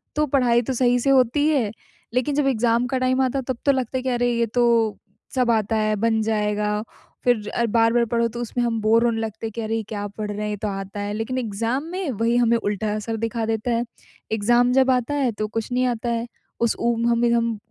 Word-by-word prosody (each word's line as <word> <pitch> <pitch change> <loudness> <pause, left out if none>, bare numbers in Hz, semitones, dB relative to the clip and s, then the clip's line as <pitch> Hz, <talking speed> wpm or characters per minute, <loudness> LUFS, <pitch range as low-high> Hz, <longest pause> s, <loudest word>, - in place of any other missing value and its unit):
तो 300 - +2
पढ़ाई 245 -3 +3
तो 265 - 0
सही 245 0 +3
से 275 - 0
होती 270 +3 +3
है 260 -9 +1 0.4
लेकिन 255 +3 0
जब 290 -1 +2
एग्ज़ाम 235 -1 +2
का 260 - -1
टाइम 255 +1 +1
आता 265 +1 +1
है - - -4
तब 260 -2 -2
तो 280 - +6
लगता 260 -1 -1
है 255 - -2
कि 260 - -1
अरे 245 0 +1
ये 235 0 +1
तो 245 - +3 0.7
सब 250 -2 +2
आता 220 0 +1
है 215 0 +1
बन 220 +1 +1
जाएगा। 210 -1 0 0.4
फ़िर 220 -4 +1
अ, 235 - +1
बार-बार 230 +1 +3
पढ़ो 235 0 +1
तो 235 +1 -7
उसमें 240 +1 -2
हम 225 -1 -1
बोर 225 +2 +4
होने 230 -1 +1
लगते 220 0 -5
हैं 220 - -7
कि 230 - -3
अरे 220 +1 -2
ये 225 - -2
क्या 205 -2 -4
पढ़ 210 +1 -5
रहे 205 - -5
हैं 210 - -2
ये 210 - -3
तो 210 - -3
आता 195 0 -5
है। 205 0 -3
लेकिन 225 +4 -3
एग्ज़ाम 230 +4 -2
में 365 -4 -3
वही 230 +2 0
हमें 235 -1 +3
उल्टा 210 -1 -2
असर 225 +1 -3
दिखा 230 0 -2
देता 225 +2 -1
है। 235 +1 +1 0.5
एग्ज़ाम 240 +3 +3
जब 265 0 +4
आता 250 +2 0
है 265 -4 +1
तो 215 0 -3
कुछ 225 +3 -4
नहीं 250 +1 +1
आता 240 -1 -1
है। 235 0 -1 0.3
उस 235 -1 +1
उ 235 0 +2
हमें 235 0 +2
हम 230 -1 +1
235 Hz, 245 wpm, -23 LUFS, 220-250 Hz, 0.7 s, तो